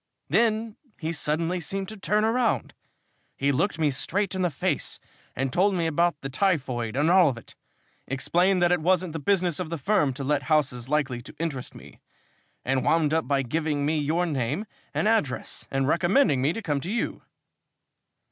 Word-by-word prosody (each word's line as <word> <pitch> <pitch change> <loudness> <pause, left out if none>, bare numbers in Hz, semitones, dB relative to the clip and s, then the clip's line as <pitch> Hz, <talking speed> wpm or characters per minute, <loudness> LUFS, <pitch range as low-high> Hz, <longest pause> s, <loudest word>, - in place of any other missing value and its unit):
Then 225 -1 +1 0.2
he 160 0 -2
suddenly 165 +3 -1
seemed 190 +4 -4
to 220 - -7
turn 210 +2 +1
round. 225 - +1 0.6
He 140 +1 +2
looked 165 +7 0
me 155 -3 +2
straight 195 +9 -1
in 190 - -2
the 180 - +2
face 145 - -2 0.4
and 135 0 -2
told 195 +2 +3
me 170 -2 0
about 170 0 +1
the 135 - -4
typhoid 130 - 0
and 150 +5 +3
all 180 -4 +6
of 125 - -4
it, 115 - -12 0.5
explained 175 +7 +2
that 175 - +4
it 180 -2 +2
wasn't 180 0 +1
the 160 - -3
business 180 0 +1
of 180 -3 -3
the 170 - -3
firm 165 -2 +2
to 140 - -5
let 145 +1 +1
houses 135 -5 +1
likely 140 -5 0
to - - -12
interest 145 -6 -4
me, - - -13 0.7
and 130 0 +1
wound 160 -2 +2
up 160 0 +1
by 140 -1 +1
giving 150 +2 -1
me 155 +1 +1
your 160 +5 +1
name 145 - -2 0.3
and - - 0
address 215 - -1
and 135 -1 0
recommending 170 - +3
me 140 +4 +2
to 225 +6 -5
come 145 -6 -1
to 170 - -5
you." 235 - -2
160 Hz, 185 wpm, -26 LUFS, 140-185 Hz, 0.7 s, all